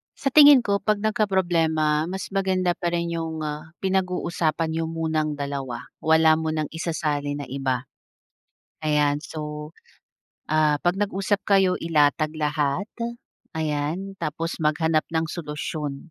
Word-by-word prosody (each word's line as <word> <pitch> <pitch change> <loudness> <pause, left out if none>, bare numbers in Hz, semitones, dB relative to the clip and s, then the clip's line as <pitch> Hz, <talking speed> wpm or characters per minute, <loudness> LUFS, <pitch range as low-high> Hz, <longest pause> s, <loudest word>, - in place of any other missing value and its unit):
Sa 275 - -2
tingin 290 -3 +8
ko, 200 -2 +1
'pag 210 0 0
nagkaproblema, 170 -8 +1
mas 190 +1 -5
maganda 190 -2 +1
pa 175 - -2
rin 170 0 -1
yung, 160 -1 -3
ah, 155 +2 -5
pinag-uusapan 180 -4 0
niyo 165 0 -1
munang 160 -2 -1
dalawa. 140 -4 -4 0.2
Wala 160 0 +4
munang 155 -1 -2
isasali 150 -3 -2
na 145 - -5
iba, 130 -2 -1 1.0
ayan. 150 -1 +2
So, 150 -1 -6 0.8
ah, 155 -1 +3
'pag 175 +1 +2
nag-usap 200 0 0
kayo, 190 -2 +3
ilatag 155 -1 +2
lahat, 150 +4 -1 0.7
ayan, 160 +5 -2
tapos 165 +3 -3
maghanap 155 +1 +2
ng 160 0 +1
solusyon, 150 -1 -5
160 Hz, 125 wpm, -24 LUFS, 150-180 Hz, 1.0 s, tingin